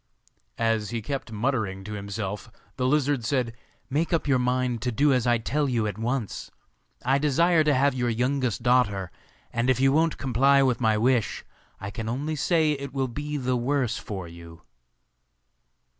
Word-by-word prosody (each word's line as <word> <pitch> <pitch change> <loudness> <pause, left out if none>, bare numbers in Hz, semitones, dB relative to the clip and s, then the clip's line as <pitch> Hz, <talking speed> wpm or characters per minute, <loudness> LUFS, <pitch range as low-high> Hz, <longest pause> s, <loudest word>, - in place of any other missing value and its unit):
As 115 -2 0
he 120 - -2
kept 135 +2 -5
muttering 110 -4 -1
to 105 +2 -7
himself 100 +1 -5 0.3
the 125 -1 0
lizard 145 -2 +1
said, 120 0 0 0.3
'Make 155 +5 -1
up 165 -3 0
your 130 -3 +3
mind 125 -1 0
to 125 - -1
do 140 +4 +3
as 125 -1 +1
I 120 0 +4
tell 145 +5 -1
you 115 -3 0
at 105 0 -4
once. 120 -1 -3 0.6
I 135 +2 +3
desire 160 +3 +3
to 150 -1 +3
have 140 +1 +3
your 125 -1 -1
youngest 125 0 -1
daughter, 105 -7 +2 0.4
and 115 +2 0
if 130 -1 +2
you 135 0 +4
won't 160 +2 +2
comply 135 +2 +3
with 130 -2 +1
my 110 -2 +3
wish, 120 0 +1 0.3
I 100 +1 -6
can 110 +1 -5
only 145 +6 -2
say 155 +1 +2
it 140 -2 -4
will 135 -1 0
be 145 +4 -4
the 130 -2 0
worse 125 -1 0
for 95 -4 -6
you. 85 -1 -13
125 Hz, 175 wpm, -26 LUFS, 110-140 Hz, 0.6 s, I